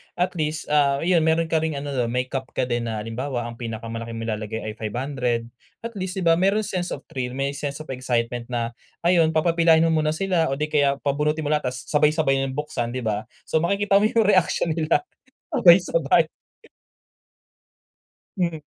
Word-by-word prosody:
At 180 0 -1
least, 155 0 -2
ah, 140 -2 +3
ayun, 170 -2 +3
meron 160 +1 +2
ka 160 - +2
ring 160 -1 -1
ano, 145 +1 -4
'no 125 -2 +1 0.3
cap 135 -1 -3
ka - - 0
din 120 -1 -1
na 110 -2 -3
halimbawa, 120 +1 -4
ang 115 - -10
pinakamalaki 115 0 -5
mong 115 0 -5
ilalagay 110 +1 -3
ay 110 0 -5
500. 120 +1 -2 0.3
At 230 -2 -6
least, 185 0 -4
'di - - -2
ba, 165 0 +5
merong 200 +4 +2
sense 180 -1 -3
of 140 - -6
thrill, 125 -2 -4
may 135 +1 -1
sense 145 +1 -4
of 155 - -12
excitement 120 -2 -2
na 120 -1 -2 0.3
ayon, 170 -2 +4
papapilahin 165 0 +4
mo - - +2
muna 155 0 0
sila, 175 -2 +1
o - - 0
'di 150 +2 -2
kaya 140 -2 +3
pabunutin 150 +2 0
mo 145 - -2
lahat 150 -4 0
tapos 125 - -7
sabay-sabay 150 -2 +3
na 130 - -4
buksan, 120 -5 -3
'di 130 - -3
ba? 110 -1 -2 0.2
So - - +2
makikita 200 +4 +2
mo 205 - +3
yung 225 0 +3
reaction 185 -3 +3
nila 160 0 +1 0.5
sabay-sabay. 170 -3 +5 2.1
Hmm. 170 -3 0
150 Hz, 185 wpm, -23 LUFS, 120-165 Hz, 2.1 s, ba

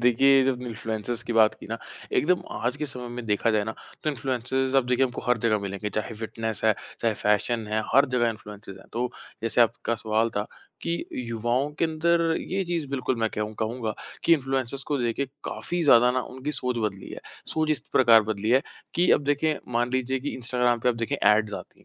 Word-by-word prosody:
देखिए, 130 +3 +5
जब 130 -1 0
इन्फ्लुएंसर्स 110 -1 -4
की 120 - -4
बात 110 -1 +5
की - - -9
ना 115 +2 -4 0.3
एकदम 180 +3 +2
आज 120 +4 -2
के 150 +1 -3
समय 125 -3 -6
में 120 0 -6
देखा 105 +2 +2
जाए 105 -2 +2
ना, 110 - -4 0.3
तो 155 - +1
इन्फ्लुएंसर्स, 130 0 -1
अब 130 -2 +3
देखिए 125 +1 +3
हमको 125 -1 -4
हर 125 -1 +3
जगह 110 -2 +3
मिलेंगे 100 +1 -4
चाहे 110 +2 -3
फ़िटनेस 110 0 -4
है, 110 -2 +5 0.3
चाहे 115 -2 +1
फ़ैशन 105 +2 +1
है 110 +1 0
हर 140 +2 +7
जगह 120 -1 +3
इन्फ्लुएंसर्स 105 -2 -10
हैं। - - -16
तो, 120 +2 -1 0.3
जैसे 115 +1 +1
आपका 115 0 +2
सवाल 110 +1 +2
था 105 +1 0 0.4
कि, 170 0 -2
युवाओं 120 +3 -1
के - - +3
अंदर 165 +2 +2 0.2
ये 195 +1 -2
चीज़ 170 -4 -2
बिल्कुल 130 -2 -1
मैं 110 - +2
केहूँ 105 0 -3
कहूँगा 110 0 -2 0.3
कि, 170 - +5
इन्फ्लुएंसर्स 135 -2 -2
को 145 - +2
लेके 120 +2 0 0.2
काफ़ी 175 0 -1
ज़्यादा 125 -3 +7
ना 130 +1 +1
उनकी 130 +4 -5
सोच 125 -3 0
बदली 100 -3 -3
है। - - -7 0.3
सोच 155 -1 0
इस 150 -6 +1
प्रकार 115 -3 +7
बदली 110 0 -2
है 130 +3 +5 0.3
कि, 175 +1 +3
अब 145 - +2
देखें 145 +2 +1 0.2
मान 120 +1 +1
लीजिए 130 +1 0
कि 145 - -3
इंस्टाग्राम 125 -1 +1
पे 125 - +2
अब 120 - +1
देखें 115 +5 -1
ऐड्स 105 -3 +3
आती - - -9
हैं - - -23
120 Hz, 210 wpm, -26 LUFS, 110-135 Hz, 0.4 s, हर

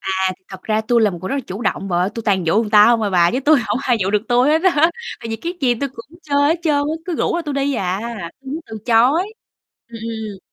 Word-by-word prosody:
À, 190 - -3 0.3
thì 185 - -44
thật 190 -1 -10
ra 215 0 0
tui 235 +2 +2
là 210 - +3
một 175 - -7
người 185 - -4
rất - - -2
là 280 - -1
chủ 195 +5 -6
động 195 -2 -2
bà 175 - 0
ơi, 180 +2 +1
tui 230 - -5
toàn 190 -4 +1
dụ 160 - +2
người 215 - -5
ta 210 -1 +7
hông 235 -2 +3
à 205 - 0
bà 175 -2 +4
chứ 255 - -1
tui 300 +3 +5
hổng 220 0 -2
ai 245 -3 +2
dụ 190 0 0
được 210 0 +1
tui 245 +2 +3
hết 315 +2 +3
á, 330 -3 +4 0.3
tại 230 - -7
vì 225 - -3
cái 335 +10 -4
gì 250 -3 +2
tui 275 +4 -3
cũng 270 +6 -14
chơi 285 -2 0
hết 330 +2 +1
trơn 310 -3 +2
á, 290 +2 0
cứ 355 - -3
rủ - - 0
là 345 - -2
tui 295 -3 -4
đi 280 0 0
à, 185 -1 -2 0.4
tui 265 - -8
muốn 315 - -4
từ 220 -1 -7
chối, 265 - +3 0.6
ừm, 235 - -10
ừm. 220 -3 -5
235 Hz, 300 wpm, -19 LUFS, 205-285 Hz, 0.6 s, ta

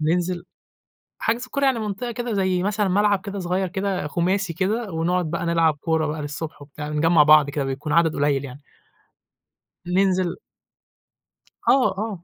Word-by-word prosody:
ننزل 175 +3 0 0.7
حجز 240 +3 -1
كورة 280 +2 -1
يعني 260 -3 +3
منطقة 215 +3 -4
كده 240 0 -4
زي 185 -3 +1
مثلًا 205 0 0
ملعب 200 +1 +2
كده 200 0 -6
صغير 185 +1 -1
كده 190 -3 -2
خماسي 180 +3 0
كده، 200 +4 -2
ونقعد 170 0 0
بَقى 170 0 -2
نلعب 165 -2 +3
كورة 160 -1 0
بَقى 150 0 -3
للصبح 145 +1 -6
وبتاع، 150 +1 -8
نجمّع 150 +1 +4
بعض 150 -1 +6
كده، 140 -1 -2
بيكون 140 +3 -3
عدد 165 -2 +3
قليل 140 -1 +1
يعني. 140 +1 -9 1.3
ننزل 185 -1 +1 1.3
آه، 265 -1 +5
آه 205 -4 -4
180 Hz, 150 wpm, -23 LUFS, 155-200 Hz, 1.3 s, بعض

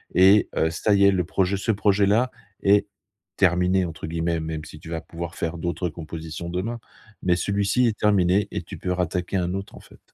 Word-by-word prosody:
et 95 +3 +6
heu, 80 - +2
ça 100 +5 +1
y 100 - +4
est 100 - +7
le 90 -2 +1
projet 95 +2 0
ce 110 +3 0
projet-là 105 +4 +2 0.3
est 100 +1 +4 0.5
«terminé» 90 0 +3
entre 80 -2 -6
guillemets, 85 0 -1
même 80 -1 -4
si 75 - -11
tu 80 - -11
vas 80 -1 -3
pouvoir 85 0 -7
faire 85 +1 -3
d'autres 85 +1 -2
compositions 80 +1 -7
demain, 105 +7 -3 0.4
mais 90 -1 +3
celui-ci 100 +7 +1
est 110 - -1
terminé 100 -1 +3
et - - -3
tu - - -9
peux 90 - -3
rattaquer 90 +1 -1
un 90 0 -1
autre, 100 +1 -6
en - - -11
fait. - - -18
90 Hz, 200 wpm, -24 LUFS, 85-100 Hz, 0.5 s, est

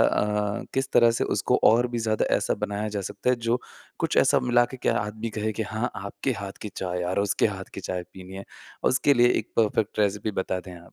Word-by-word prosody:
अ, 105 0 +1
किस 135 0 0
तरह 120 -1 +6
से 115 - 0
उसको - - +1
और 120 +3 +6
भी 120 -1 -3
ज़्यादा 110 -1 +1
ऐसा - - 0
बनाया 105 +1 -3
जा 105 -1 -3
सकता 100 +5 -1
है। 125 - +2
जो 115 +1 0 0.4
कुछ - - -1
ऐसा - - +5
मिलाकर 120 +1 +2
क्या - - +2
आदमी 110 +2 -4
कहे 110 0 -2
कि 110 - -2
हाँ 110 +4 -2
आपके 100 +7 -3
हाथ 100 -1 -5
की 105 - -4
चाय 90 -1 -2
यार 90 +2 -1
उसके 100 +1 +2
हाथ 95 -2 -6
की - - -5
चाय 90 -1 -3
पीनी 95 0 -11
है। 100 - -7 0.5
उसके 135 +3 +4
लिए 120 -1 +5
एक 110 - -6
परफ़ेक्ट 110 -1 +1
रेसिपी 105 +1 +1
बता 95 -1 -2
दें 90 0 -10
आप। 85 0 -16
105 Hz, 225 wpm, -26 LUFS, 100-115 Hz, 0.5 s, तरह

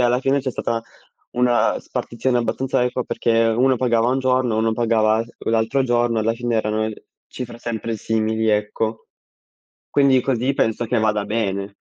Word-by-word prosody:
alla 125 0 +3
fine 135 +1 +1
c'è 130 - -3
stata 115 -1 -2 0.5
una 125 -1 +2
spartizione 125 +1 -2
abbastanza 130 +2 0
equa 125 0 -1
perché 115 0 +1
uno 125 +3 +3
pagava 120 -1 +2
un 130 - +1
giorno, 130 -3 +1
uno 110 0 +1
pagava 110 -1 +2
s 115 - -17 0.2
l'altro 115 +4 +1
giorno, 120 -2 +1
alla 110 +1 +1
fine 120 0 -2
erano 110 0 0 0.4
cifre 120 -2 -7
sempre 115 -1 -3
simili, 110 0 -1
ecco. 110 +1 -1 0.8
Quindi 135 -2 +4
così 130 +1 0
penso 115 0 0
che 120 0 +1
vada 105 -1 +1
bene. 100 -2 -2
115 Hz, 155 wpm, -21 LUFS, 110-125 Hz, 0.8 s, Quindi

